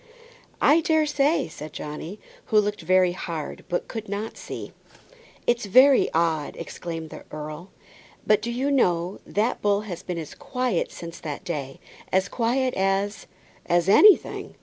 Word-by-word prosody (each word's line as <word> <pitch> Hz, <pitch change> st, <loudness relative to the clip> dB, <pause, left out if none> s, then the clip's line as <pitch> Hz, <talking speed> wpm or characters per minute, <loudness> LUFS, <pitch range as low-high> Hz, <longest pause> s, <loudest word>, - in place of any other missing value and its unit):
"I 315 Hz, +3 st, +5 dB
daresay," 310 Hz, -, +2 dB
said 155 Hz, -1 st, -9 dB
Johnny, 155 Hz, +7 st, -7 dB, 0.3 s
who 215 Hz, -, +4 dB
looked 210 Hz, 0 st, -1 dB
very 185 Hz, -1 st, +3 dB
hard, 170 Hz, -4 st, -5 dB
but 175 Hz, -, -2 dB
could 220 Hz, -3 st, -6 dB
not 205 Hz, +2 st, -4 dB
see. -, -, -7 dB, 0.7 s
"It's 240 Hz, -3 st, +1 dB
very 260 Hz, +6 st, +6 dB
odd," 160 Hz, -3 st, 0 dB
exclaimed 165 Hz, -1 st, -6 dB
the -, -, -9 dB
earl, 155 Hz, +4 st, -7 dB, 0.6 s
"but 215 Hz, -, +4 dB
do 235 Hz, -, -3 dB
you 265 Hz, +4 st, -1 dB
know, 180 Hz, -8 st, +1 dB
that 220 Hz, +5 st, 0 dB
bull 205 Hz, 0 st, +2 dB
has 180 Hz, -5 st, -7 dB
been 180 Hz, -2 st, -5 dB
as 160 Hz, -3 st, -6 dB
quiet 250 Hz, -8 st, -2 dB
since 170 Hz, 0 st, -9 dB
that 150 Hz, -2 st, -6 dB
day, 140 Hz, -5 st, -5 dB, 0.3 s
as 190 Hz, +1 st, +2 dB
quiet 250 Hz, +2 st, 0 dB
as 195 Hz, +2 st, -1 dB, 0.4 s
as 175 Hz, 0 st, +2 dB
anything. 395 Hz, -, +5 dB
195 Hz, 150 wpm, -25 LUFS, 170-235 Hz, 0.7 s, very